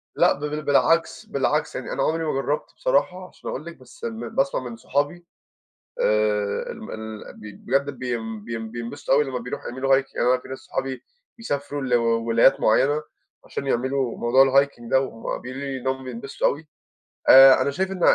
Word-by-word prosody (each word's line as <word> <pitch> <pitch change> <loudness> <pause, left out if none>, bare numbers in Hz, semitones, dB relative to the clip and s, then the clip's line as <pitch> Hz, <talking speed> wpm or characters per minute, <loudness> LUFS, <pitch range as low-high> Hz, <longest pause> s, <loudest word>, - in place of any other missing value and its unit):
لأ - - +4
ب - - -11 0.3
بالعكس 165 +4 +2
بالعكس، - - -1
يعني - - -5
أنا - - 0
عمري 165 +1 0
ما 155 - 0
جرّبت 140 +2 -2
بصراحة 185 - 0
عشان - - -10
أقول 150 - -5
لِك 170 0 -9
بس 130 -2 -18
م 115 0 -4
باسمع 135 +2 0
من 120 -2 -7
صحابي، 145 +8 -2 0.8
آآ 105 -1 +1
ال - - -10
م - - -8
ال 110 -1 -8
ب - - -17 0.3
بجد 140 +3 +1
بين 115 -5 -4
بين 115 -1 -5
بينبسطوا 120 +5 -3
أوي 145 - +4
لمّا 130 -3 -4
بيروحوا 125 +1 -6
يعملوا 135 +2 +2
Hike، 135 - -20
أنا 125 +1 +2
في - - -13
ناس 130 0 -7
صحابي 135 -1 -4 0.3
بيسافروا 145 -9 -3
لولايات 115 -1 +3
معيّنة 145 +7 +3 0.4
عشان 140 - -5
يعملوا 130 0 0
موضوع 125 +3 +5
الhiking 135 -3 +1
ده 130 - +5
وهم 115 -4 -5
بيقولوا 130 +2 -7
لي 135 -1 -3
إن 130 - -6
هم 130 0 -1
بينبسطوا 130 +1 -2
أوي، 150 +2 -3 0.6
آآ 135 0 +9
أنا - - 0
شايف 190 +7 -2
إن 190 -1 -5
130 Hz, 180 wpm, -24 LUFS, 120-140 Hz, 0.8 s, آآ